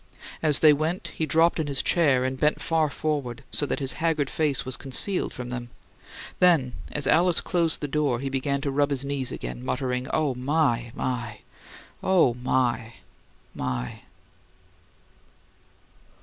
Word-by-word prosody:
As 150 Hz, -3 st, +3 dB
they 155 Hz, -2 st, +8 dB
went, 165 Hz, +4 st, -2 dB
he 160 Hz, 0 st, -3 dB
dropped 165 Hz, +3 st, +3 dB
in 155 Hz, -, -1 dB
his 140 Hz, -1 st, 0 dB
chair 140 Hz, -7 st, +3 dB
and 130 Hz, 0 st, -3 dB
bent 150 Hz, 0 st, +2 dB
far 160 Hz, -2 st, +1 dB
forward, 140 Hz, -4 st, -3 dB
so 145 Hz, -, -1 dB
that -, -, -1 dB
his 135 Hz, -2 st, 0 dB
haggard 155 Hz, -4 st, +1 dB
face 150 Hz, -4 st, 0 dB
was 130 Hz, 0 st, -3 dB
concealed 180 Hz, +8 st, +1 dB
from 125 Hz, -1 st, -7 dB
them. 120 Hz, -1 st, -5 dB, 0.7 s
Then, 160 Hz, -9 st, +4 dB, 0.2 s
as 150 Hz, -, -1 dB
Alice 170 Hz, +2 st, +4 dB
closed 170 Hz, -3 st, 0 dB
the 145 Hz, -, -2 dB
door, 140 Hz, -4 st, 0 dB
he 135 Hz, -, -4 dB
began 135 Hz, +1 st, -1 dB
to 140 Hz, -1 st, -2 dB
rub 145 Hz, +1 st, +2 dB
his 140 Hz, -1 st, -1 dB
knees 140 Hz, -2 st, -2 dB
again, -, -, -6 dB
muttering, 125 Hz, -, -2 dB
"Oh, 150 Hz, -4 st, +1 dB
my, 125 Hz, -3 st, 0 dB
my! 120 Hz, -6 st, -3 dB, 0.6 s
OH, 180 Hz, -10 st, +3 dB
my, 125 Hz, -2 st, 0 dB, 0.6 s
my!" 60 Hz, -1 st, -4 dB
140 Hz, 150 wpm, -25 LUFS, 125-155 Hz, 0.7 s, they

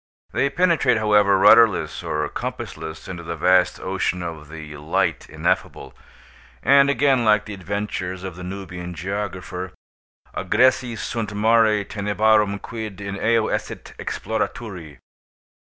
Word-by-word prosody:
They 140 Hz, -, +1 dB
penetrate, 165 Hz, -7 st, +2 dB
however, 105 Hz, -2 st, +4 dB
rudderless 105 Hz, +1 st, +5 dB
or 75 Hz, 0 st, -2 dB
compassless 80 Hz, 0 st, -6 dB
into 90 Hz, -2 st, -6 dB
the 85 Hz, 0 st, -5 dB
vast 90 Hz, +3 st, +3 dB
ocean 95 Hz, -1 st, -2 dB
of 80 Hz, -3 st, -7 dB
the 75 Hz, -1 st, -9 dB
"light 75 Hz, +2 st, -1 dB
ineffable," -, -, -2 dB, 0.7 s
and 140 Hz, +3 st, +5 dB
again, 140 Hz, -3 st, +3 dB
like 105 Hz, -1 st, +3 dB
the 105 Hz, -, -7 dB
adventures 95 Hz, -1 st, -4 dB
of 95 Hz, -3 st, -6 dB
the 90 Hz, -, -9 dB
Nubian 90 Hz, -2 st, -7 dB
geographer, 95 Hz, -1 st, -5 dB, 0.6 s
"agressi 125 Hz, -2 st, +2 dB
sunt 110 Hz, -1 st, -4 dB
mare 110 Hz, -1 st, +3 dB
tenebrarum, 105 Hz, 0 st, +1 dB
quid 110 Hz, -2 st, -7 dB
in 100 Hz, -1 st, -5 dB
eo 115 Hz, +2 st, +2 dB
esset -, -, -4 dB
exploraturi." 90 Hz, -10 st, -4 dB
100 Hz, 125 wpm, -22 LUFS, 90-110 Hz, 0.7 s, rudderless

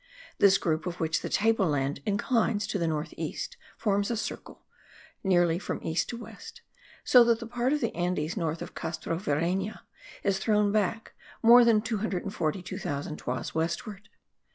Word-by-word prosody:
This 195 Hz, -1 st, +6 dB
group 160 Hz, -2 st, -1 dB
of 175 Hz, 0 st, -5 dB
which 160 Hz, -1 st, 0 dB
the -, -, -4 dB
table 220 Hz, -1 st, +2 dB
land 140 Hz, -2 st, -1 dB
inclines 210 Hz, +1 st, +1 dB
to 200 Hz, -, -2 dB
the 170 Hz, -, 0 dB
north 155 Hz, -1 st, -2 dB
east, -, -, -4 dB, 0.2 s
forms 200 Hz, -1 st, +1 dB
a 235 Hz, -, -1 dB, 0.2 s
curve, -, -, -15 dB, 0.7 s
nearly 175 Hz, -3 st, +3 dB
from -, -, -4 dB
east 165 Hz, +1 st, -1 dB
to 240 Hz, -, -4 dB
west, 225 Hz, -2 st, -11 dB, 0.4 s
so 250 Hz, -2 st, +7 dB
that 235 Hz, -1 st, +2 dB
the 230 Hz, -, -6 dB
part 245 Hz, +2 st, -1 dB
of 300 Hz, 0 st, +1 dB
the -, -, -1 dB
Andes 175 Hz, -2 st, -1 dB
north 165 Hz, -4 st, -2 dB
of -, -, -10 dB
Castrovireyna 170 Hz, +5 st, -2 dB, 0.4 s
is 195 Hz, -1 st, +1 dB
thrown 210 Hz, 0 st, +2 dB
back 215 Hz, +2 st, -1 dB, 0.3 s
more 240 Hz, +2 st, +9 dB
than 225 Hz, -2 st, +4 dB
242,000 185 Hz, -7 st, -3 dB
toises 125 Hz, -1 st, -4 dB
westward. 170 Hz, +6 st, -3 dB
195 Hz, 155 wpm, -28 LUFS, 165-220 Hz, 0.7 s, more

